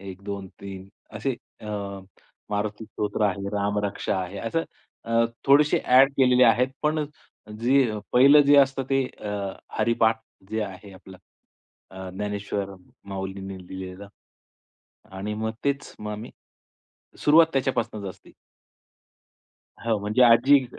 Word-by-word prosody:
1, 95 0 -9
2, 100 -1 -6
3 95 -1 -8 0.3
असे 125 +4 -1 0.3
अ, 100 -2 -5 0.5
मारुती 105 +1 -2
स्तोत्र 105 0 -3
आहे, 100 0 -2
रामरक्षा 100 -1 -1
आहे. 90 +2 -7
असं 165 +8 -1 0.4
अ, 115 0 +2 0.2
थोडेसे 145 +2 +5
ॲड 130 +2 +6
केलेले 125 -1 +5
आहेत. 120 +2 +4
पण 150 0 +1 0.6
जी 130 0 +3 0.2
पहिलं 140 +4 +7
जे 145 0 +6
असतं, 135 0 +3
ते 135 -1 +2 0.2
अ, 105 - -4 0.5
हरिपाठ 110 0 +2 0.3
जे 110 0 -1
आहे 95 0 -10
आपलं 95 0 -13 0.7
अ, 95 -1 -8
ज्ञानेश्वर 100 0 -4 0.3
माऊलींनी 95 0 -5
लिहिलेलं 95 +1 -8 1.1
आणि 105 +2 -3
मग 110 +1 -2
तेच 140 0 -2
मग 105 0 -5
आम्ही 105 +2 -7 0.9
सुरुवात 160 +2 +6
त्याच्यापासूनच 120 -6 -1
असती. - - -17 1.5
हो. 115 -1 0
म्हणजे 105 +5 0
आजी 130 +3 +6
105 Hz, 120 wpm, -25 LUFS, 100-130 Hz, 1.5 s, पहिलं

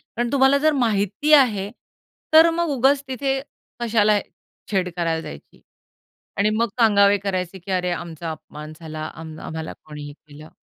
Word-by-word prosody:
कारण 240 0 -4
तुम्हाला 275 0 +4
जर 310 +2 +3
माहिती 225 +2 0
आहे, 210 -8 +3 0.6
तर 320 +1 +8
मग 340 0 -1
उगाच 270 +3 +3
तिथे 270 +1 -1 0.4
कशाला 215 -3 +3 0.5
छेड 185 -3 0
करायला 165 -2 0
जायची. - - -11 0.8
आणि 210 +1 +3
मग 230 +2 +1
सांगावे 205 -2 +5
करायचे, 190 -1 -3
की 185 +3 -10
अरे 180 -1 0
आमचा 165 -1 -5
अपमान 150 -1 -9
झाला 155 -1 -7
आम 160 -1 -9
आम्हाला 160 0 -5
कोणी 150 -1 -9
हे 145 - -8
केलं. 150 +1 -15
200 Hz, 150 wpm, -22 LUFS, 165-250 Hz, 0.8 s, तर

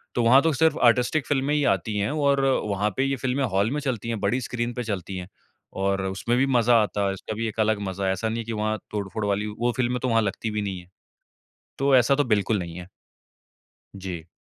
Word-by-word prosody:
तो 120 - +2
वहाँ 130 +4 +6
तो 160 -1 +1
सिर्फ़ 160 +4 +2
आर्टिस्टिक 125 +5 +3
फिल्में 140 0 +1
ही 150 - +1
आती 105 +3 -5
है 100 +7 0
और 140 -2 +2 0.3
वहाँ 100 +1 0
पे 135 - +2
ये 135 0 0
फिल्में 130 +2 -1
हॉल 100 -1 +1
में 150 - -1
चलती 120 -5 -3
है 115 - -1
बड़ी 125 +6 0
स्क्रीन 120 0 -3
पे 125 - -4
चलती 95 -3 -4
है। 90 -1 -6 0.5
और 100 0 +1
उसमें 100 +6 -1
भी 135 - +3
मज़ा 120 -2 +3
आता 105 -1 -1
है, 95 - 0
उसका 95 +2 -6
भी 115 +1 -2
एक 110 +1 -6
अलग 110 -1 +2
मज़ा 95 +1 -3
है, 95 - +2
ऐसा 105 +4 -2
नहीं 115 - -3
है - - -3
कि 115 - -4
वहाँ 110 0 -1
तोड़-फोड़ 105 +1 -3
वाली 100 +1 0
वो 120 0 +1
फिल्में 125 0 0
तो 130 - 0
वहाँ 115 0 +3
लगती 105 +2 -3
भी 105 0 -2
नहीं 95 -2 -4
हैं। 90 0 -16 0.9
तो 135 0 +3
ऐसा 125 +2 +4
तो 145 - +2
बिल्कुल 105 -2 +1
नहीं 85 -2 -6
है। 90 - -7
जी। - - -24 1.1
जी। 90 -4 -6
115 Hz, 240 wpm, -25 LUFS, 100-125 Hz, 1.1 s, वहाँ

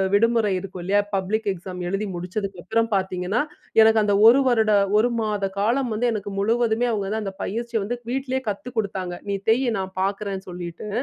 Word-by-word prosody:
விடுமுறை 230 -1 +3
இருக்கும் 185 -1 -7
இல்லயா! 200 +3 +2 0.2
பப்ளிக் 210 +3 -1
எக்ஸாம் 180 0 -8
எழுதி 195 +2 -1
முடிச்சதுக்கு 185 +1 -4
அப்பறம் 225 +3 0
பார்த்தீங்கன்னா, 190 +3 0 0.4
எனக்கு 220 0 +6
அந்த 205 - +2
1 250 +4 +7
வருட 220 -3 +3 0.3
1 225 +3 +4
மாத 210 -2 -1
காலம் 240 +5 +1
வந்து 225 +3 0
எனக்கு 210 -2 -4
முழுவதுமே 230 +3 +1
அவுங்க 205 -3 -1
தான் 220 0 -2
அந்த 195 -1 -4
பயிற்சிய 235 +2 -2
வந்து 240 +5 -2
வீட்லயே 265 0 -1
கத்துக் 235 +5 -6
கொடுத்தாங்க. 190 -4 -2 0.2
"நீ - - 0 0.2
தெய் 250 +4 +3
நான் 190 0 -4
பார்க்குறேன்னு 195 0 -2
சொல்லிட்டு," 175 +2 -7
210 Hz, 175 wpm, -23 LUFS, 190-230 Hz, 0.4 s, 1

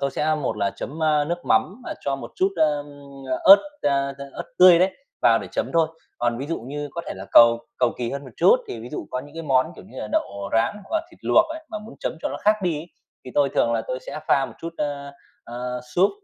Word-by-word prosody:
tôi 140 0 0
sẽ 155 +3 0
một 145 -7 -2
là 100 -1 0
chấm, 160 +3 -6
a, 150 -1 +3
nước 175 +2 -4
mắm, 225 +7 +1
ờ, - - -4
cho 140 -1 -1
một 135 - -9
chút, 190 - +2
ơ, 150 -2 +2 0.6
ớt, 195 +1 +11 0.2
a, 140 -1 +1
a, 140 - -6
ớt - - -6
tươi 180 -2 +9
đấy 185 +2 +3 0.3
vào - - +5
để - - -7
chấm - - -2
thôi. 165 -1 +3 0.3
Còn 120 0 0
ví 140 - -4
dụ 165 - -3
như 145 +4 -5
có 170 - -4
thể - - -4
là 95 +1 -8
cầu 115 0 +7
cầu - - +2
kỳ 120 -1 -2
hơn 140 0 -5
một 130 - -11
chút 185 +8 +6
thì 115 - -6
ví 120 - -8
dụ 150 - -5
có 125 - -2
những 145 +2 -14
cái 165 - -5
món, 130 -4 +3
kiểu - - -12
như 130 - -11
là, 105 - -5
đậu 100 0 -2
rán 115 - +2
hoặc 325 - -1
là 330 - -9
thịt - - -19
luộc 325 - +5
ấy, 315 0 -7
mà 215 - -4
muốn 215 +2 -11
chấm - - -2
cho - - 0
nó - - -5
khác 210 +1 +4
đi 170 -4 0
ấy 165 - -10 0.4
thì 125 - -8
tôi 145 -1 +4
thường 115 -3 +1
là 115 -1 0
tôi 130 - -3
sẽ 155 - -6
pha 135 -1 +3
một - - -12
chút, 165 0 -6
ơ, 140 -1 -4 0.3
ờ, 125 +1 -5
súp, 190 +3 +4
145 Hz, 270 wpm, -23 LUFS, 125-170 Hz, 0.6 s, ớt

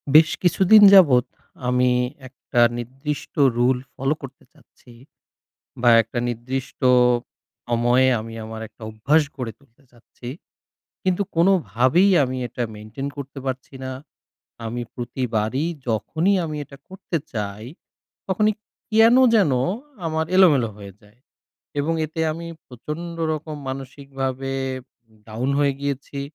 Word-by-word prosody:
বেশ 160 0 +8
কিছুদিন 190 +4 +6
যাবৎ 140 -11 +7 0.4
আমি 125 0 +3 0.4
একটা 125 -2 -2 0.2
নির্দিষ্ট 135 +5 -5 0.2
রুল 125 +1 +3 0.2
ফলো 135 +2 0
করতে 135 -1 -10
চাচ্ছি 125 - -21 0.9
বা 120 - +5
একটা 115 +2 -5
নির্দিষ্ট 130 +4 -5 0.9
সময়ে 120 +2 +3
আমি 115 +1 -8
আমার 110 0 -7
একটা 115 - -28
অভ্যাস 135 +9 +2
গড়ে 125 -4 -4
তুলতে 140 -1 -28
চাচ্ছি, 120 0 -14 0.8
কিন্তু 185 +1 +1
কোনোভাবেই 170 - +3
আমি 130 0 -4
এটা 120 - -4
মেনটেন 110 +6 -7
করতে 140 0 -7
পারছি 130 +1 -5
না। 130 - -4 0.8
আমি 120 +2 -4
প্রতিবারই 120 +1 -2 0.2
যখনই 155 - 0
আমি 155 -1 -5
এটা 140 - -14
করতে 185 -2 -4 0.2
চাই, 105 -1 -4 0.6
তখনই 210 +3 +2 0.4
কেন 225 +2 +6 0.2
যেন 195 -10 +4 0.5
আমার 160 0 -1
এলোমেলো 150 - +5
হয়ে 100 -1 -10
যায়। 105 +3 -23 0.6
এবং 150 +3 0
এতে 160 +1 -6
আমি 170 +2 -7 0.2
প্রচণ্ড 150 +7 -7 0.2
রকম 155 0 -5
মানসিকভাবে 135 0 -5 0.8
down 115 +4 -3
হয়ে 140 -1 +3
গিয়েছি 140 0 -4
135 Hz, 120 wpm, -22 LUFS, 120-155 Hz, 0.9 s, বেশ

